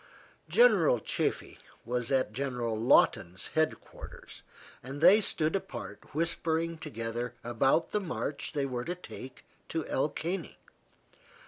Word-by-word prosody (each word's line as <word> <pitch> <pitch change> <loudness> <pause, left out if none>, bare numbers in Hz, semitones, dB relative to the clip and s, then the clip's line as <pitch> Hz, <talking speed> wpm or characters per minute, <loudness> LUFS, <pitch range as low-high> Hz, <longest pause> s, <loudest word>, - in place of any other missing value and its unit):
General - - +5
Chaffee - - -2 0.3
was 125 0 -2
at 130 -5 +1
General 125 -3 -2
Lawton's 95 -6 +3
head 155 0 +1
quarters, - - -12 0.4
and 135 +3 -7
they 195 +7 +7
stood 160 -4 0
apart 190 -5 -6
whispering 165 0 0
together 120 -3 -4
about 135 +7 +2
the 210 - 0
march 160 -5 -4
they 145 -2 0
were 125 -2 -3
to 175 +5 -3
take 130 -7 -10 0.2
to 160 -2 -2
El 140 +3 0
Caney. 175 +6 -4
145 Hz, 125 wpm, -30 LUFS, 120-165 Hz, 0.4 s, they